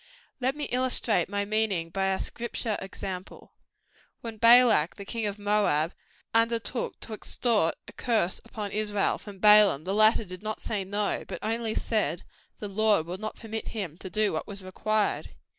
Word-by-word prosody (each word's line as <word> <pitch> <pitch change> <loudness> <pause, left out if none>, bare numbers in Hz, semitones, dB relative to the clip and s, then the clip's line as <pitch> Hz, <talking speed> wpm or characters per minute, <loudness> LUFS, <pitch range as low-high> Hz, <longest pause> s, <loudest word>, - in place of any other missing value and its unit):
Let 260 +2 0
me 295 - -5
illustrate 245 -7 +3
my 200 0 -1
meaning 200 -6 0
by 195 +2 -1
a 190 0 +1
Scripture 235 -1 -3
example. 190 -1 -7 0.7
When 225 -2 -7
Balak, 230 -7 +6
the 200 - -9
king 225 0 -3
of 205 0 -4
Moab, 205 -6 +1 0.4
undertook 230 +1 +1
to 225 - -6
extort 215 -4 +1
a - - -10
curse 220 -7 0
upon 215 -3 -6
Israel, 210 -1 0
from 205 -2 -11
Balaam, 210 -6 +6
the 190 +3 -3
latter 215 +1 +4
did 185 -1 -9
not 215 0 -4
say 210 -3 -3
no; 205 +2 -1
but - - -5
only 225 0 -2
said, 215 -6 -1 0.3
the 210 - -6
Lord 205 -4 +2
would 180 +3 -6
not 215 0 -5
permit 220 -1 -6
him 180 -7 -4
to 190 - -7
do 215 -1 +1
what 160 - -3
was 200 -2 -8
required. 210 +3 -1
210 Hz, 170 wpm, -27 LUFS, 195-225 Hz, 0.7 s, Balak